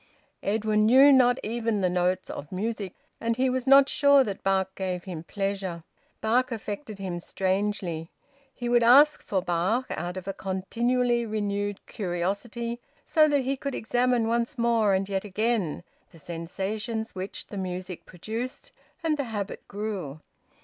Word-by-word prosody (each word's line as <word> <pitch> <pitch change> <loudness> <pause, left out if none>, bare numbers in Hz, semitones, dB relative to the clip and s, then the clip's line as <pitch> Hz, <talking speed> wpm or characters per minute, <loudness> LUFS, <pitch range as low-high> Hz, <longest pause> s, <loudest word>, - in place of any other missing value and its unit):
Edwin 215 +1 +2
knew 270 +5 +8
not 250 -2 +5
even 225 -1 -1
the 185 - +3
notes 180 +1 0
of 140 - -8
music, 200 0 -3 0.2
and 230 0 0
he 260 0 +2
was 255 0 -2
not 275 0 +8
sure 280 -1 +5
that 200 -5 -5
Bach 190 -1 +1
gave 185 -2 -3
him 175 -5 -6
pleasure. 195 -2 -3 0.4
Bach 245 +4 +2
affected 215 0 -5
him 185 -3 -4
strangely. 185 -3 -2 0.4
He 245 -2 -5
would 240 0 +4
ask 280 +6 +6
for 190 -3 -1
Bach 185 +8 +1
out 175 +1 -4
of 185 0 -7
a 195 - -2
continually 235 +6 0
renewed 205 -1 -2
curiosity, 210 +5 -3 0.3
so 310 -2 +5
that 290 -2 +2
he 265 +2 -1
could 280 0 -4
examine 245 0 +1
once 235 +4 0
more 230 -4 +3
and 190 0 -1
yet 195 -1 -2
again 210 -5 -1 0.3
the 170 - -17
sensations 195 +8 -4
which 190 +1 -6
the 205 - -8
music 185 -1 -5
produced; 230 - -6 0.3
and 315 -2 +1
the 280 - -1
habit 210 -4 -5
grew. 200 -8 -4
210 Hz, 155 wpm, -27 LUFS, 190-240 Hz, 0.4 s, knew